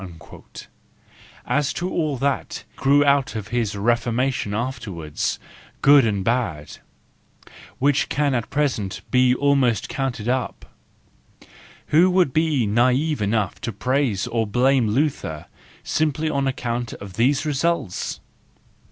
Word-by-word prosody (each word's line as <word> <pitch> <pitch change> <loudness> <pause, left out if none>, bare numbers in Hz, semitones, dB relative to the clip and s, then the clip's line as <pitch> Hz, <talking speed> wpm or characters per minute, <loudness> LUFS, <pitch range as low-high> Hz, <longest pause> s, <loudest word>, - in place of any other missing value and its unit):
—As 140 +3 0
to 175 - -3
all 155 -6 -1
that 140 +2 -2
grew 145 +2 +3
out 140 -3 +2
of 105 -2 -5
his 115 -3 -1
Reformation 120 +2 0
afterwards, 105 - -3 0.5
good 140 -3 +7
and 100 -3 -1
bad, 95 -10 -2 1.0
which 140 +1 +1
can 145 -1 +1
at 120 -3 -2
present 130 -10 -1
be 125 -1 +4
almost 135 -6 +1
counted 135 -8 -3
up,— 125 0 -2 1.2
who 170 +5 +5
would 180 -7 +2
be 155 -6 +1
naTve 125 +6 +1
enough 105 -2 -1
to 115 - -3
praise 125 -1 0
or 115 -2 -1
blame 125 +2 +2
Luther 110 - -1 0.4
simply 155 0 0
on 140 -2 0
account 120 -2 -3
of 100 -2 -10
these 135 - +1
results? 150 - -1
130 Hz, 115 wpm, -22 LUFS, 110-145 Hz, 1.2 s, good